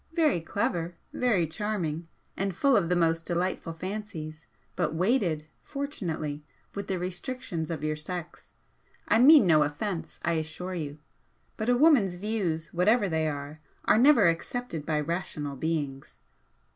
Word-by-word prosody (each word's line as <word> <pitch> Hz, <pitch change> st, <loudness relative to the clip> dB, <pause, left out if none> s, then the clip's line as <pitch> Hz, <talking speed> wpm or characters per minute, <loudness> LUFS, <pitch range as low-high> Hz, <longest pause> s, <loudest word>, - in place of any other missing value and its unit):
Very 305 Hz, -, +3 dB
clever 170 Hz, -1 st, -2 dB, 0.2 s
very 220 Hz, -9 st, +2 dB
charming 170 Hz, -3 st, -3 dB, 0.3 s
and 195 Hz, -2 st, -2 dB
full 275 Hz, +7 st, +4 dB
of 175 Hz, -6 st, +2 dB
the 180 Hz, -, +3 dB
most 165 Hz, -1 st, +2 dB
delightful 175 Hz, -1 st, -2 dB
fancies, 165 Hz, -4 st, -6 dB, 0.3 s
but 160 Hz, -3 st, -1 dB
weighted 175 Hz, -5 st, +1 dB
(fortunately) 170 Hz, -, -4 dB, 0.3 s
with 200 Hz, -1 st, -5 dB
the 190 Hz, -, -1 dB
restrictions 180 Hz, -, -4 dB
of 160 Hz, -3 st, -4 dB
your 155 Hz, 0 st, 0 dB
sex. 170 Hz, +2 st, -7 dB, 0.6 s
I 225 Hz, -, +4 dB
mean 280 Hz, -1 st, +8 dB
no 160 Hz, -4 st, +5 dB
offence, 165 Hz, +5 st, -2 dB
I 170 Hz, -, +2 dB
assure 170 Hz, +4 st, -5 dB
you, 150 Hz, -4 st, -4 dB, 0.6 s
but 220 Hz, +2 st, -2 dB
a 245 Hz, -, +4 dB
woman's 255 Hz, -, +5 dB
'views,' 180 Hz, -5 st, -2 dB
whatever 205 Hz, +5 st, +3 dB
they 160 Hz, -1 st, +1 dB
are, 145 Hz, +1 st, -5 dB, 0.2 s
are -, -, +5 dB
never 250 Hz, -6 st, +6 dB
accepted 170 Hz, 0 st, -2 dB
by 155 Hz, -2 st, +1 dB
rational 150 Hz, -3 st, -3 dB
beings." 145 Hz, -3 st, -3 dB
175 Hz, 145 wpm, -28 LUFS, 155-210 Hz, 0.6 s, mean